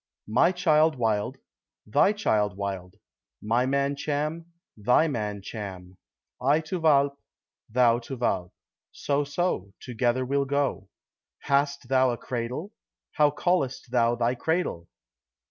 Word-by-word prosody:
"My 170 +11 +4
child 160 -4 +3
Wild, 115 +1 -1 0.5
thy 110 - +3
child 105 - 0
Wild; 95 -2 -5 0.4
my 120 +4 +1
man 140 +1 +1
Cham, 150 +3 -3 0.3
thy 125 +9 +3
man 105 -7 -3
Cham; 95 -4 -7 0.5
I 140 +4 +3
to 170 +3 -4
Walpe, 140 -3 +3 0.5
thou 120 0 +4
to 125 +2 -7
Walpe, 95 -7 -1 0.4
so, 145 0 -1
so, 140 - -2
together 125 +1 -1
we'll 140 +2 0
go." 140 -8 -1 0.5
"Hast 140 -2 0
thou 130 0 +3
a 120 - -2
cradle? 125 - -4 0.4
How 150 -1 +4
callest 145 -5 -1
thou 120 -1 +3
thy 120 +1 +1
cradle?" 160 - -2
130 Hz, 125 wpm, -26 LUFS, 110-145 Hz, 0.5 s, My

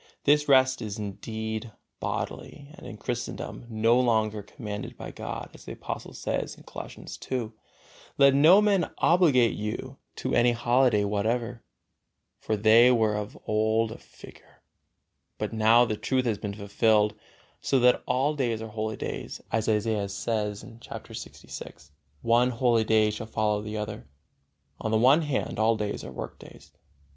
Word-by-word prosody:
This 150 0 +3
rest 130 -1 +4
is 105 -1 -5
indeed 110 +2 -5 0.3
bodily 145 -1 -5
and 180 - -12
in 110 - -8
Christendom 120 +1 -5
no 115 +2 +3
longer 110 -4 +1
commanded 105 -1 -7
by - - -7
God, - - -6
as - - -15
the - - -6
Apostle - - -7
says, - - -3
Colossians - - -9
ii, 120 -4 -1 0.7
"Let 140 -1 +6
no 165 +9 +7
man 200 -5 +2
obligate 150 -10 +4
you 120 +5 -5 0.2
to - - -3
any 120 0 +4
holiday 120 -2 +3
whatever" 115 +4 -1 0.8
for 110 - -1
they 115 +4 +6
were 110 -3 +2
of 105 0 -5
old 110 +1 +1
a - - -9
figure, - - -17 0.7
but - - -3
now 115 +2 +5
the 110 -2 -2
truth 130 +2 0
has 110 -4 0
been 105 -2 -5
fulfilled, 105 +1 +2 0.5
so 135 - +1
that 125 0 +4
all 140 +4 +1
days 120 -6 -1
are 110 0 -6
holy 110 0 -3
days, - - -5
as 110 0 0
Isaiah 105 -2 0
says, 105 0 -3 0.2
chapter - - -9
lxvi, 75 - -10 0.3
"One 120 +2 +4
holy 120 -2 +2
day 110 -1 +3
shall 110 +1 -6
follow 105 -1 0
the 105 0 -5
other"; 105 -5 -5 0.7
on 110 - -2
the 110 - +2
other 130 +8 +5
hand, 145 -7 -2
all 110 +1 +3
days 105 -1 -3
are - - -8
workdays. - - -10
110 Hz, 150 wpm, -27 LUFS, 105-125 Hz, 0.8 s, no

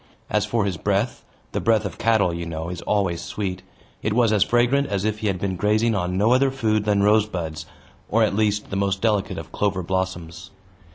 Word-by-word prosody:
As - - +1
for 115 -3 0
his 95 -4 -2
breath 100 +7 -1 0.3
the - - -2
breath 110 -2 +2
of 95 - -6
cattle, 110 -6 +2
you 85 0 -4
know, 80 0 -5
is 90 - -6
always 95 -5 0
sweet 95 -3 -4 0.4
it 110 - -1
was 115 -2 +3
as 105 - +2
fragrant 120 +6 +3
as 100 0 -2
if 110 0 -1
he 110 - -2
had 95 -2 0
been 95 0 -2
grazing 110 +5 +2
on 90 -2 -1
no 105 +4 +3
other 135 +1 +4
food 110 -5 0
than 100 -1 +2
rosebuds, 90 -7 +1 0.4
or 115 +1 +3
at 105 - +1
least, 105 -1 0
the - - -2
most 95 0 0
delicate 105 -3 0
of - - -8
clover 100 -3 -1
blossoms. 95 -1 -3
100 Hz, 210 wpm, -23 LUFS, 95-110 Hz, 0.4 s, other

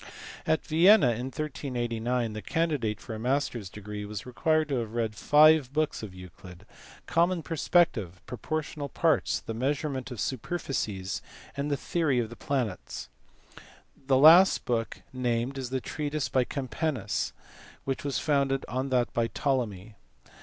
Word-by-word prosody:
At 160 - +1
Vienna 165 - +6
in 120 +3 -3
1389 125 -5 -2
the 110 - -5
candidate 145 -11 -1
for 115 - -8
a 110 - -5
master 130 +1 0
s 100 -4 -8
degree 105 +1 -7
was 105 0 -6
required 155 +5 +1
to 135 - 0
have 115 -1 -5
read 115 -2 0
five 150 +3 +5
books 155 +1 -1
of 100 -4 -8
Euclid, 90 +1 -12 0.4
common 170 0 +1
perspec 170 +2 +3
tive, 90 -5 -7
proportional 145 +3 -4
parts, 160 +2 +1
the 115 - -5
measurement 135 +1 -2
of 125 -4 -7
superficies, 110 - -3 0.3
and 140 +1 -2
the 145 - 0
Theory 155 -3 0
of 115 -2 -1
the - - -8
Planets. 125 -10 -3 0.9
The 135 0 0 0.5
book 115 -2 -2
last - - -35
named 125 +1 -1
is 130 -2 -4
the 130 0 -1
treatise 150 +2 -3
by 130 -2 +2
Campanus 130 - -2 0.5
which 135 -1 -2
was 140 -2 -1
founded 140 -2 +1
on 130 +4 -2
that 125 -2 +1
by 115 -1 +1
Ptolemy. 110 -8 -2
130 Hz, 150 wpm, -28 LUFS, 115-145 Hz, 0.9 s, Vienna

